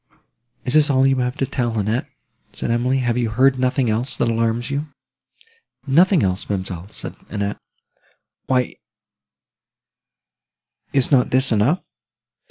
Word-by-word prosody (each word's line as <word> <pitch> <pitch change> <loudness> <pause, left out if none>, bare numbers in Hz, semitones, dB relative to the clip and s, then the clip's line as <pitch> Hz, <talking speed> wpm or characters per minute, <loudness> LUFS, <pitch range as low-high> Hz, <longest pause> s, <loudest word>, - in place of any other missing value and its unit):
"Is 125 - +2
this 150 -1 +5
all 135 -1 +3
you 135 0 +3
have 125 +2 -1
to 135 - 0
tell, 120 -4 -2
Annette?" 110 +4 -1 0.5
said - - -3
Emily. 125 +3 +1
"Have 120 0 +1
you 120 -2 0
heard 130 +4 +3
nothing 130 0 +1
else, 115 +4 -1
that - - +1
alarms 115 +2 0
you?" 145 +2 -2 1.0
"Nothing 170 +5 +4
else, 95 0 -1
ma'amselle!" 95 -2 -4
said - - -7
Annette; 100 -1 -3 0.9
"why, 125 -2 0 2.1
is 135 0 +2
not 130 -3 +4
this 130 0 +2
enough?" 115 - +1
125 Hz, 135 wpm, -21 LUFS, 115-135 Hz, 2.1 s, this